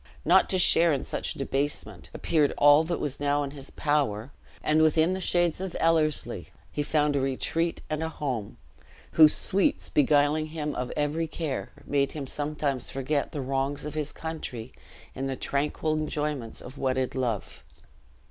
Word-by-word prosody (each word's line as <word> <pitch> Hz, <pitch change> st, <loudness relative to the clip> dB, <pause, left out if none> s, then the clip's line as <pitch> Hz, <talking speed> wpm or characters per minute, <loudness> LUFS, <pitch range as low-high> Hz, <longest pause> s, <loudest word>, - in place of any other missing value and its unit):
Not -, -, +5 dB
to 190 Hz, -, +2 dB
share 170 Hz, -1 st, +5 dB
in 140 Hz, -, 0 dB
such -, -, -3 dB
debasement, 135 Hz, -, -3 dB
appeared 150 Hz, -4 st, +1 dB
all 145 Hz, +2 st, +7 dB
that 170 Hz, +1 st, -2 dB
was 140 Hz, -2 st, -3 dB
now 145 Hz, 0 st, +1 dB
in 140 Hz, -, -5 dB
his 140 Hz, -2 st, -7 dB
power; 140 Hz, -6 st, 0 dB, 0.3 s
and 155 Hz, +1 st, +3 dB
within 160 Hz, +3 st, +4 dB
the 190 Hz, -, -3 dB
shades 175 Hz, -1 st, +1 dB
of 190 Hz, -2 st, -4 dB
Ellerslie 160 Hz, -3 st, +1 dB, 0.2 s
he 150 Hz, -, -2 dB
found 150 Hz, 0 st, +1 dB
a -, -, +2 dB
retreat 160 Hz, +5 st, -1 dB
and 155 Hz, 0 st, -2 dB
a 160 Hz, -, -1 dB
home, 125 Hz, -9 st, -4 dB, 0.5 s
whose 155 Hz, -1 st, +7 dB
sweets 195 Hz, 0 st, +1 dB
beguiling 150 Hz, +1 st, +3 dB
him 155 Hz, -2 st, -4 dB
of 125 Hz, 0 st, -3 dB
every 150 Hz, +3 st, 0 dB
care, 155 Hz, -3 st, -4 dB, 0.2 s
made 140 Hz, -1 st, +1 dB
him 145 Hz, -3 st, -4 dB
sometimes 145 Hz, -2 st, -2 dB
forget 140 Hz, +2 st, -1 dB
the 145 Hz, -, -4 dB
wrongs 135 Hz, +2 st, -2 dB
of 150 Hz, -, -5 dB
his 150 Hz, -1 st, -2 dB
country 130 Hz, -7 st, -6 dB, 0.4 s
in 135 Hz, +1 st, -3 dB
the 135 Hz, -, -2 dB
tranquil 150 Hz, +4 st, -1 dB
enjoyments 150 Hz, -5 st, -3 dB
of 130 Hz, +3 st, -10 dB
wedded 130 Hz, -1 st, 0 dB
love. 120 Hz, -6 st, -3 dB
145 Hz, 165 wpm, -27 LUFS, 135-155 Hz, 0.5 s, all